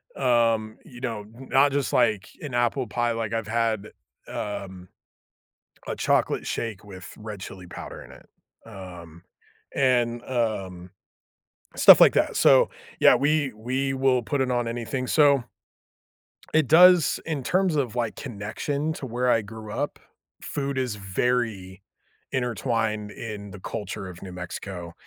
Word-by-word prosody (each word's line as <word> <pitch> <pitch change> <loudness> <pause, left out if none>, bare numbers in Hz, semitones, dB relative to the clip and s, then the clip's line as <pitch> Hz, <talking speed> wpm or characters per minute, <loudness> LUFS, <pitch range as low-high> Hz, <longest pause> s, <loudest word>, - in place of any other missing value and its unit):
um, 115 -4 +1
you 125 -1 -13
know, 115 -5 -4
not 135 +3 +2
just 140 -1 -1
like 100 -3 +2
an 145 -5 -6
apple 120 +1 +1
pie, 120 +1 0
like, 115 -1 -3
I've 115 -2 -2
had, 110 -2 -1 0.4
um, 95 -3 -6 1.0
a - - -3
chocolate - - +1
shake 110 -3 -4
with 95 -3 -10
red 105 -3 -8
chili 95 -1 -9
powder 90 - -9
in - - -14
it, - - -16 0.4
um, 90 -5 -11 0.5
and, 120 -3 +2
um, 95 -8 -3 0.9
stuff - - +9
like - - +8
that, - - +1
so, - - +5 0.3
yeah, - - +7
we 145 +1 +1
we 130 +5 -2
will 130 -2 +2
put 140 +3 -1
it 130 - 0
on 120 -1 0
anything, 120 +2 -3
so 140 -3 +4 1.1
It 155 -4 +3
does 180 0 +6
in 150 -5 -3
terms 185 0 +1
of, 125 -5 -1
like, 115 -3 -1
connection 140 +7 -3
to 135 - -7
where 125 +1 -1
I 115 - +4
grew 110 0 -9
up, 145 +5 -3 0.4
food 140 -1 -3
is 125 -5 -1
very 100 -2 -2 0.5
intertwined 110 -3 -1
in 105 -3 -7
the 100 - -10
culture 100 0 -5
of 90 -1 -10
New 95 - -8
Mexico 90 -1 -7
115 Hz, 145 wpm, -25 LUFS, 105-130 Hz, 1.1 s, stuff